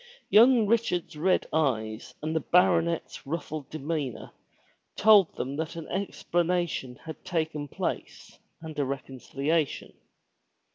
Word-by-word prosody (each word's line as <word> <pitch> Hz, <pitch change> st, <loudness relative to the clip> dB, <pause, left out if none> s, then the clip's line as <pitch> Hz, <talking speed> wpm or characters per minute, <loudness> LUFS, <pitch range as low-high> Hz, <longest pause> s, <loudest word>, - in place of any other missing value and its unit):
Young 235 Hz, +1 st, +7 dB
Richard's 205 Hz, -7 st, 0 dB
red 180 Hz, +5 st, +2 dB
eyes 115 Hz, -8 st, -1 dB
and 155 Hz, +1 st, -2 dB
the -, -, +3 dB
baronet's 170 Hz, -4 st, +1 dB
ruffled 155 Hz, -1 st, -4 dB
demeanor 150 Hz, -4 st, -4 dB, 0.6 s
told 205 Hz, -4 st, +6 dB
them 135 Hz, +3 st, -4 dB
that 160 Hz, +1 st, -3 dB
an 165 Hz, -2 st, -7 dB
explanation 175 Hz, -7 st, -1 dB
had 160 Hz, -1 st, -8 dB
taken 155 Hz, -4 st, -2 dB
place -, -, -5 dB, 0.2 s
and 155 Hz, -2 st, -6 dB
a -, -, +3 dB
reconciliation. 140 Hz, +3 st, -2 dB
160 Hz, 110 wpm, -28 LUFS, 145-175 Hz, 0.6 s, Young